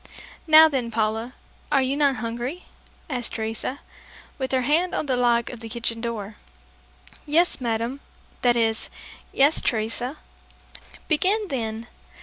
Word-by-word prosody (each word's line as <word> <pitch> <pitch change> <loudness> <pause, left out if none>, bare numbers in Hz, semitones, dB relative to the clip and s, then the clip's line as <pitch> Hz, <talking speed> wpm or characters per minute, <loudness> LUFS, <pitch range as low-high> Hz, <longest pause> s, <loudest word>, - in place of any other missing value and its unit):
"Now 315 0 +9
then, 265 -6 -2
Paula, 225 +2 -1 0.4
are 275 -2 +4
you 260 +2 0
not 285 -2 +3
hungry?" 240 +8 -4 0.4
asked 250 -6 -2
Teresa 225 +5 -3 0.6
with 260 -1 -2
her 260 -1 +1
hand 325 +7 +1
on - - -1
the 265 -3 +1
lock 240 -1 +2
of 245 - -9
the 225 -1 -7
kitchen 230 0 -2
door. 220 -3 -5 0.9
"Yes, 325 -1 +2
madame... 235 +3 -2 0.4
that 240 -1 +4
is 225 -1 +1 0.4
yes, 285 +3 +4
Teresa." 235 +5 -2 0.9
"Begin 385 +6 +2
then! 225 -4 -3
245 Hz, 135 wpm, -24 LUFS, 230-285 Hz, 0.9 s, Now